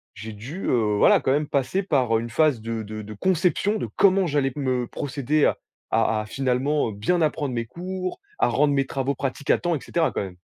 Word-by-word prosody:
j'ai 110 0 -7
dû, 130 - -7
heu, 110 -4 +2
voilà, - - +5
quand 130 - +1
même 150 +2 +1
passer 140 +9 0
par, 130 - +1
heu, - - -1
une 115 - -6
phase 145 -2 +2
de 115 0 -4
de 110 +1 -7
de 105 +1 -8
conception 185 - +1
de - - -3
comment 195 -1 +4
j'allais 140 -3 +1
me 130 -4 -1
procéder 145 +1 0
à - - +2 0.3
à 110 -1 +2
à - - -7
finalement, 135 +3 0
heu, - - -6
bien 115 - 0
apprendre 150 -4 0
mes 115 0 -2
cours, 185 - -5 0.2
à - - +4
rendre 145 0 +2
mes 135 -1 +1
travaux 135 0 -2
pratiques 135 +1 -4
à - - +4
temps, 175 -1 0
et 145 - -3
cetera 165 -2 0
quand - - -2
même. 95 -2 -8
135 Hz, 230 wpm, -24 LUFS, 115-155 Hz, 0.3 s, voilà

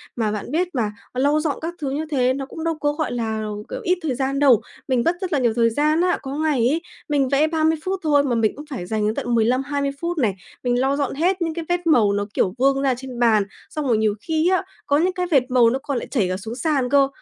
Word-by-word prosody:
mà 220 -3 0
bạn 210 +4 -5
biết 345 +3 +1
mà, 215 -4 0 0.2
lau 285 +4 +2
dọn 305 -2 -1
các 335 +2 -3
thứ 275 - -1
như 305 +3 -2
thế 255 -2 +2
nó 270 0 -4
cũng 320 +4 -8
đâu 330 -1 0
có, 290 0 +1
gọi 310 -2 -2
là, 220 -2 -2 0.3
kiểu, - - -4
ít 360 +1 +2
thời 280 -6 -1
gian 270 +1 -1
đâu, 265 -6 +5 0.3
mình 250 -3 +1
mất 340 +1 +2
rất 365 -4 -3
là 280 - +3
nhiều 235 -3 +2
thời 230 -1 +3
gian 305 +7 +2
á. 360 0 +2
Có 275 0 -5
ngày 310 -3 +1
ấy, 320 +5 +1 0.3
mình 275 -3 +2
vẽ 290 +3 +3
30 320 0 +1
phút 380 0 -2
thôi 290 -2 +4
mà 250 -4 0
mình 220 -2 +1
cũng 295 +2 -9
phải 240 -11 -5
dành 215 +2 -1
đến 215 - 0
tận 240 -1 -1
15-20 275 +5 +1
phút 340 0 -2
này, 215 -9 +1 0.3
mình 245 0 +1
lau 270 +2 +1
dọn 280 -2 -1
hết 360 +4 +1
những 330 -1 -1
cái 330 -1 -5
vết 350 -1 0
màu 215 -10 +4
nó, 205 0 -1
kiểu, 185 - +1
vương 275 +1 +3
ra 270 -2 +2
trên 255 -2 -8
bàn, 220 -4 +4 0.3
xong 300 -3 -3
rồi 230 -3 +3
nhiều 215 -1 +2
khi 320 +2 +1
á, 375 0 +2 0.2
có 285 0 +2
những 360 +3 +2
cái 360 -1 -2
vệt 270 -4 +5
màu 240 -2 +5
nó 260 +3 -1
còn 280 -4 -2
lại - - -4
chảy 215 -9 +1
cả 185 - -1
xuống 225 +4 -7
sàn 275 -4 0
cơ, 280 -1 +4
275 Hz, 275 wpm, -22 LUFS, 240-315 Hz, 0.3 s, đâu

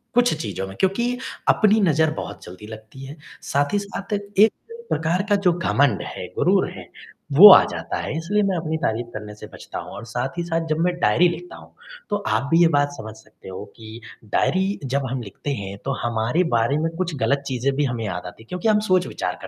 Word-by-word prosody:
कुछ 245 0 +4
चीज़ों 95 - -4
में। 95 - -10
क्योंकि 235 +6 0 0.3
अपनी 215 0 +4
नज़र 160 -4 +3
बहुत - - -7
जल्दी 95 +4 -11
लगती 110 +4 -11
है। 140 +4 -10 0.2
साथ 145 +3 -1
ही 205 - +3
साथ 200 +1 -6
एक 205 +1 +3 0.4
प्रकार 165 +4 0
का 205 - +4
जो 175 - +5
घमंड 145 - +1
है, - - -7
गुरूर - - +2
है, - - -11 0.4
वो 180 +9 +11
आ - - +8
जाता - - -4
है, 150 - -4
इसलिए 205 +6 0
मैं 195 -2 0
अपनी 160 -1 -2
तारीफ़ 120 -6 -2
करने 105 0 -7
से - - -10
बचता - - -8
हूँ - - -9
और - - -8
साथ 125 +6 -4
ही 175 - -1
साथ 165 -1 -2
जब 155 - 0
मैं 180 - +1
डायरी 165 +10 +4
लिखता 350 - -7
हूँ, - - -16 0.4
तो 205 - 0
आप 115 +6 0
भी 165 +1 +5
ये 170 - +7
बात 145 -2 +2
समझ 110 -1 -8
सकते 110 -3 -15
हो 95 +2 -7
कि 110 +1 -11 0.3
डायरी 190 +2 +1
जब 135 +1 -1
हम 130 -1 -3
लिखते 100 +7 -7
हैं, 100 -6 -5
तो 135 - -1
हमारे 120 +8 0
बारे 115 +5 +2
में 160 +2 0
कुछ 175 -3 -2
गलत 140 +1 0
चीज़ें 130 +1 0
भी 145 - +1
हमें 120 -3 -3
याद 90 -3 -4
आती 90 - -12
हैं - - -25
क्योंकि 180 +4 -2
हम 215 -1 +4
सोच-विचार 185 -1 0
कर - - -8
145 Hz, 220 wpm, -22 LUFS, 115-185 Hz, 0.4 s, वो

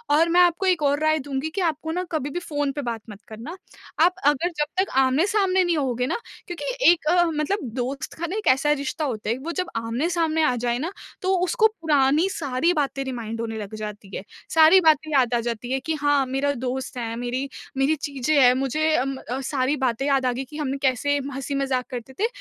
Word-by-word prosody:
और 330 +2 +4
मैं 350 +2 +5
आपको 350 +2 +3
एक 360 -4 +2
और 285 +1 +2
राय 310 0 +3
दूँगी 280 +2 -3
कि 390 - 0
आपको 320 -1 -1
ना 360 +2 -1
कभी 295 -3 -2
भी 345 - -3
फ़ोन 290 -5 -2
पे 290 - -4
बात 235 -3 -4
मत 205 -1 -10
करना, 235 - -8 0.4
आप 355 +2 +5
अगर 295 +4 +3
जब 295 - +2 0.2
तक 390 - -2
आमने-सामने 370 - +3
नहीं 345 -2 +1
होगे 250 -4 0
ना - - -1 0.3
क्योंकि 350 -1 -6 0.3
एक 325 -3 -1 0.3
मतलब 345 +8 0 0.2
दोस्त 260 +2 -3
का 340 +1 -4
ना 370 - -4
एक 430 - -4
ऐसा 270 +3 +4
रिश्ता 295 +2 -1
होता 220 -6 -3
है 235 - 0
वो 335 - -2
जब 365 0 -3
आमने-सामने 315 +8 0
आ 255 -5 +2
जाए 240 0 -1
ना, 325 +6 -3 0.3
तो 380 +1 +1
उसको 440 +2 +3
पुरानी 295 +2 +3
सारी 300 -1 0
बातें 275 -3 -1
रिमाइंड 230 -4 -5
होने 225 -1 -4
लग 210 0 -6
जाती 210 -2 -7
है। - - -5 0.3
सारी 320 +3 +7
बातें 310 -1 +3
याद 255 -4 +3
आ 240 - +3
जाती 235 +1 -4
है 265 - +1
कि 320 +5 -3
हाँ 290 -2 +3
मेरा 270 +2 0
दोस्त 255 0 -4
है, 230 -1 -3
मेरी 245 +3 -3 0.3
मेरी 275 +4 +3
चीज़ें 280 0 -2
हैं 250 -1 +7
मुझे 275 +5 0
अम 270 +2 0
अ, 255 0 -5
सारी 270 +1 0
बातें 260 -1 0
याद 270 -2 +2
आ 250 - +2
गई 260 - -3
कि 300 +4 -10
हमने 280 -2 -2
कैसे 285 +3 +1 0.2
हँसी-मज़ाक 270 -2 -1
करते 250 +1 -7
थे, 445 - +3
280 Hz, 215 wpm, -24 LUFS, 255-320 Hz, 0.4 s, सारी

